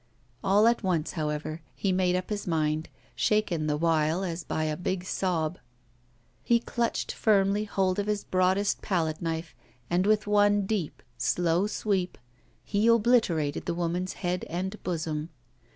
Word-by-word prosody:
All 200 +3 +4
at 235 0 +3
once, 175 -6 0
however, 155 0 -3
he 190 +9 0
made 185 -1 +2
up 185 +3 -3
his 205 -2 -3
mind, 155 -1 0 0.3
shaken 190 -8 +1
the 150 -1 +1
while 165 +2 +1
as 170 -2 -3
by 155 - -2
a 155 -1 -1
big 180 +2 -2
sob. 180 -3 -1 0.8
He 235 0 +3
clutched 235 0 -2
firmly 205 -1 +2
hold 190 -2 0
of 205 - -1
his 210 -1 -1
broadest 185 +2 +1
palette 160 -5 -1
knife, 165 -1 -3 0.4
and, 180 +3 +2
with 215 -1 +3
one 205 -1 +3
deep, 190 -6 -3 0.2
slow 175 +2 +1
sweep, 195 -4 -1 0.5
he 210 +2 +1
obliterated 220 -11 +2
the 170 - -1
woman's 175 +2 -2
head 180 -1 -2
and 190 +5 -4
bosom. 160 -3 -3
180 Hz, 150 wpm, -28 LUFS, 165-205 Hz, 0.8 s, All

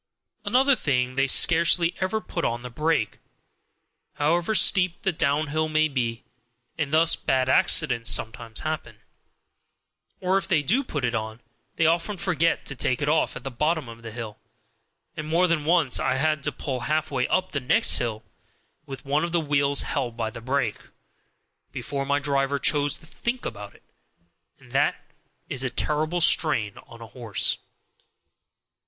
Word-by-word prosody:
Another 260 +6 +3
thing, 130 - -1
they 135 +1 +1
scarcely 170 +4 +4
ever 190 +4 -1
put 170 -5 -5
on 120 +1 -2
the 125 - -8
brake, 155 -4 -1 0.9
however 170 +7 0
steep 180 -3 +4
the 190 - +1
downhill 155 0 0
may 155 0 +2
be, 120 -5 -3 0.5
and 150 -3 -3
thus 165 +2 +4
bad 130 -1 0
accidents 125 -3 +3
sometimes 115 0 0
happen; 150 -9 -5 1.2
or 185 +1 +1
if 190 - -5
they 165 -6 +2
do 240 - +2
put 145 - -3
it 120 - -1
on, 110 0 -4 0.4
they 165 - +1
often 170 +5 +1
forget 170 -4 0
to 135 - -6
take 125 0 -1
it - - -1
off 160 +1 +1
at - - -8
the 135 - -5
bottom 150 +2 -1
of 115 0 -11
the 115 - -8
hill, 110 -2 -8 0.8
and 155 -2 -6
more 170 +3 +2
than 165 -4 0
once 165 -5 +3
I - - 0
have 130 - -2
had 155 -2 0
to 150 - +1
pull 130 -1 -4
halfway 145 -1 -1
up 185 0 0
the 145 - -1
next 125 - +3
hill, 110 -2 -3 0.6
with 135 -1 -9
one 145 +3 0
of 170 - -2
the 170 - +2
wheels 140 -2 +2
held 120 -4 -3
by 110 -2 -2
the 115 - -10
brake, 125 -3 -1 0.9
before 140 -1 -4
my 140 0 +2
driver 140 -1 0
chose 145 +1 +1
to 155 - -17
think 235 +9 -4
about 105 -2 -7
it; - - -22 0.7
and - - -19
that - - +1 0.5
is 135 -1 -4
a 130 - -1
terrible 155 +6 -1
strain 115 - +3
on 115 - -14
a 110 - -14
horse. 115 -5 0
145 Hz, 170 wpm, -25 LUFS, 125-165 Hz, 1.2 s, scarcely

